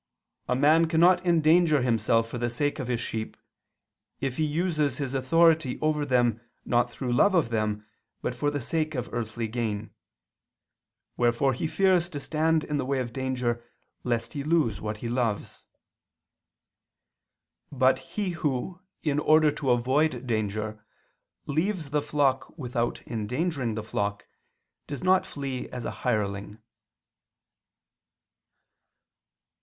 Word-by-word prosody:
"A 125 Hz, -, +1 dB
man 155 Hz, +5 st, +4 dB
cannot 175 Hz, +3 st, +4 dB
endanger 165 Hz, -3 st, +4 dB
himself 115 Hz, -1 st, +2 dB
for 120 Hz, +1 st, -6 dB
the 120 Hz, 0 st, 0 dB
sake 145 Hz, +6 st, -1 dB
of 130 Hz, -, -3 dB
his 120 Hz, -2 st, -1 dB
sheep, 110 Hz, -2 st, -4 dB, 0.8 s
if 135 Hz, -2 st, -3 dB
he 155 Hz, -, +1 dB
uses 155 Hz, -3 st, 0 dB
his 140 Hz, -3 st, -3 dB
authority 155 Hz, +1 st, +3 dB
over 150 Hz, -1 st, 0 dB
them 120 Hz, -3 st, +2 dB, 0.2 s
not 120 Hz, 0 st, +2 dB
through 120 Hz, +1 st, -3 dB
love 190 Hz, +11 st, +4 dB
of 160 Hz, -9 st, +3 dB
them 105 Hz, -1 st, -1 dB, 0.4 s
but -, -, -1 dB
for 145 Hz, -, 0 dB
the 145 Hz, 0 st, -2 dB
sake 155 Hz, +4 st, -1 dB
of 125 Hz, -, -4 dB
earthly 115 Hz, -1 st, -3 dB
gain: 110 Hz, -2 st, -3 dB, 1.3 s
wherefore 120 Hz, +3 st, +2 dB
he 130 Hz, -, -2 dB
fears 185 Hz, 0 st, +2 dB
to 145 Hz, -, -5 dB
stand 160 Hz, +2 st, +1 dB
in 150 Hz, -, -2 dB
the 135 Hz, -, -1 dB
way 135 Hz, +1 st, 0 dB
of 120 Hz, -2 st, -3 dB
danger 125 Hz, -2 st, -2 dB, 0.4 s
lest 115 Hz, -2 st, -1 dB
he 140 Hz, -2 st, -3 dB
lose 150 Hz, -9 st, +1 dB
what 105 Hz, 0 st, -3 dB
he 115 Hz, -, -5 dB
loves." 115 Hz, -4 st, -2 dB, 2.1 s
But 130 Hz, -1 st, +3 dB, 0.2 s
he 200 Hz, -3 st, 0 dB
who, 165 Hz, +2 st, -3 dB, 0.2 s
in 150 Hz, -2 st, +1 dB
order 155 Hz, 0 st, +5 dB
to 145 Hz, -2 st, -3 dB
avoid 130 Hz, +2 st, +2 dB
danger, 110 Hz, -2 st, -2 dB, 0.6 s
leaves 160 Hz, 0 st, -1 dB
the 150 Hz, 0 st, +1 dB
flock 145 Hz, -1 st, 0 dB
without 120 Hz, -4 st, -2 dB
endangering 125 Hz, +2 st, -2 dB
the 110 Hz, -, -4 dB
flock, 100 Hz, -1 st, -3 dB, 0.6 s
does 145 Hz, -, -6 dB
not 185 Hz, 0 st, +3 dB
flee 135 Hz, -3 st, -5 dB
as 120 Hz, -2 st, -6 dB
a -, -, -2 dB
hireling. 100 Hz, -1 st, -1 dB
130 Hz, 135 wpm, -27 LUFS, 120-155 Hz, 2.1 s, order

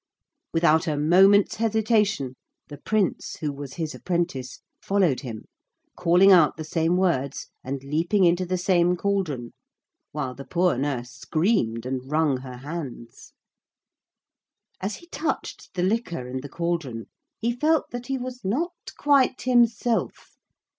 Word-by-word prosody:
Without 165 Hz, -1 st, +3 dB
a 150 Hz, -2 st, 0 dB
moment's 190 Hz, +7 st, +5 dB
hesitation 215 Hz, -, +1 dB, 0.4 s
the 145 Hz, -2 st, -9 dB
Prince, 210 Hz, +2 st, -1 dB
who 150 Hz, -2 st, -3 dB
was 140 Hz, -1 st, -8 dB
his 160 Hz, -2 st, -3 dB
apprentice, 165 Hz, -8 st, -3 dB, 0.2 s
followed 190 Hz, -9 st, +2 dB
him, 115 Hz, -6 st, -7 dB, 0.5 s
calling 180 Hz, +3 st, +5 dB
out 170 Hz, -6 st, +5 dB
the 160 Hz, -, -5 dB
same 165 Hz, +2 st, +1 dB
words 140 Hz, -8 st, -1 dB
and 135 Hz, +1 st, -5 dB
leaping 165 Hz, +8 st, +1 dB
into 175 Hz, +1 st, +3 dB
the 185 Hz, +1 st, -1 dB
same 180 Hz, -1 st, +2 dB
cauldron, 175 Hz, -11 st, -2 dB, 0.6 s
while 140 Hz, -4 st, -3 dB
the 135 Hz, -, -9 dB
poor 180 Hz, +2 st, +1 dB
nurse 125 Hz, -2 st, -2 dB
screamed 155 Hz, -, 0 dB
and 130 Hz, 0 st, -4 dB
wrung 155 Hz, -3 st, +2 dB
her 125 Hz, -1 st, -9 dB
hands. 135 Hz, -4 st, -8 dB, 1.5 s
As 200 Hz, +3 st, -3 dB
he 345 Hz, -, -15 dB
touched 315 Hz, 0 st, -4 dB
the 180 Hz, -, 0 dB
liquor 185 Hz, -, -1 dB
in 130 Hz, +1 st, -4 dB
the 145 Hz, -, -8 dB
cauldron 165 Hz, -9 st, -3 dB, 0.3 s
he 230 Hz, +2 st, 0 dB
felt 310 Hz, +4 st, +1 dB
that 245 Hz, 0 st, -6 dB
he 270 Hz, -1 st, -1 dB
was 250 Hz, 0 st, -7 dB
not 295 Hz, -, -1 dB, 0.2 s
quite 275 Hz, -3 st, +3 dB
himself. 240 Hz, -2 st, +1 dB
170 Hz, 140 wpm, -25 LUFS, 140-205 Hz, 1.5 s, moment's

